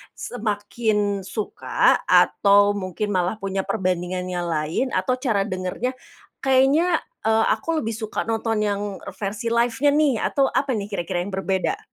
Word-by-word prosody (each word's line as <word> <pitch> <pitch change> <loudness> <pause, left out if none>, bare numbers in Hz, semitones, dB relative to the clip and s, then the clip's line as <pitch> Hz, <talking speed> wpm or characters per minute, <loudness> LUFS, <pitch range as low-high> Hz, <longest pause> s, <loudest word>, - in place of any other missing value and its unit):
Semakin 210 -2 -1
suka, 215 -3 +1
atau 200 0 +5
mungkin 200 +2 -3
malah 180 +3 +1
punya 195 -1 -2
perbandingan 185 -2 -1
yang 175 -1 -2
lain, 160 +12 -1
atau 255 - +1
cara 215 -6 0
dengernya, 185 +7 -3 0.5
kayaknya, 275 +6 +3 0.2
e 220 - +2 0.2
aku 315 +9 0
lebih 225 -3 -3
suka 220 0 -4
nonton 225 -1 0
yang 200 0 -1 0.3
versi 210 +3 -4
live 235 0 +1
nya 290 0 +4
nih, 300 -3 +4
atau 275 -1 +1
apa 270 -4 0
nih 200 -1 -3
kira-kira 175 +1 -2
yang 200 - -7
berbeda? 190 0 -1
210 Hz, 145 wpm, -23 LUFS, 190-240 Hz, 0.5 s, atau